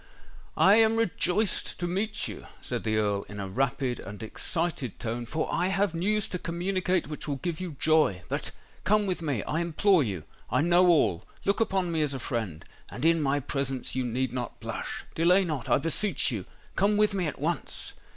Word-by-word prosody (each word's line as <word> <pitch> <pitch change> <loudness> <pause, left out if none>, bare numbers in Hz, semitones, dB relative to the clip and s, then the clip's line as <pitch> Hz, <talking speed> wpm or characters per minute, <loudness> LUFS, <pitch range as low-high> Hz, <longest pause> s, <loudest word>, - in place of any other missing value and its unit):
"I 200 +3 +7
am 225 0 +5
rejoiced 205 -1 +1
to 175 - -1
meet 200 +3 -1
you," 105 - -7 0.2
said - - -3
the 110 -1 +1
Earl 100 -2 +1
in 105 0 -7
a 100 - -3
rapid 125 +3 -1
and 105 +2 -8
excited 155 - -2
tone; 120 0 -3
"for 155 +5 -1
I 180 - +2
have 195 -1 +1
news 205 +5 +1
to 180 - -3
communicate 180 +1 0
which 150 0 -6
will 145 - -1
give 165 +3 -3
you 175 -5 -5
joy! 155 - +3
But—come 210 +1 -1
with 185 -3 -1
me—I 150 +1 -1
implore 170 +2 +3
you—I 105 - -3
know 175 +3 +5
all—look 165 - +1
upon 190 -5 +1
me 160 -1 +1
as 145 -2 0
a - - -4
friend—and 115 - -5
in 165 -1 +4
my 140 0 +2
presence 135 -1 -2
you 130 - 0
need 125 +1 -1
not 125 -3 -4
blush. - - -5
Delay 180 +4 +4
not—I 150 -8 +1
beseech 165 +1 +1
you—come 190 - -1
with 210 -1 +3
me 185 -4 0
at 150 - -4
once!" 160 +1 -2
160 Hz, 175 wpm, -28 LUFS, 125-185 Hz, 0.2 s, I